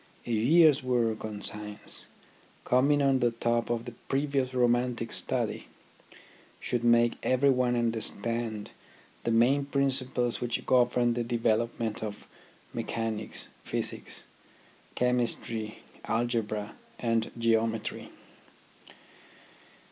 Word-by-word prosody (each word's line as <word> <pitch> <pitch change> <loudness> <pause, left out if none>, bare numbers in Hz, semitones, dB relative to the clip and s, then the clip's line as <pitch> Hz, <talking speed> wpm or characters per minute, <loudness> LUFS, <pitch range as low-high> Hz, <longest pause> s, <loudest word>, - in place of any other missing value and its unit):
A - - -4
year's 145 +7 +5
work 120 -4 0
on 105 -1 -6
science, 105 0 -6 0.6
coming 140 +3 +3
on 135 -1 +3
the 120 -1 +3
top 120 0 0
of 120 -1 -1
the 120 - -6 0.2
previous 135 -2 0
romantic 120 -1 +1
study, - - -1 0.9
should 120 -1 -2
make 120 0 +4
everyone 130 -1 +3
understand 115 -1 0 0.5
the - - +1
main 120 +5 +4
principles 130 -3 0
which 120 -1 -2
govern 120 -1 +3
the 120 0 -1
development 115 -1 0
of 105 -2 -6 0.5
mechanics, 115 -2 -3
physics, - - -4 0.7
chemistry, 120 -3 -1 0.2
algebra 110 -3 -1 0.2
and 115 -1 0
geometry. 115 -1 0
120 Hz, 95 wpm, -29 LUFS, 115-125 Hz, 0.9 s, year's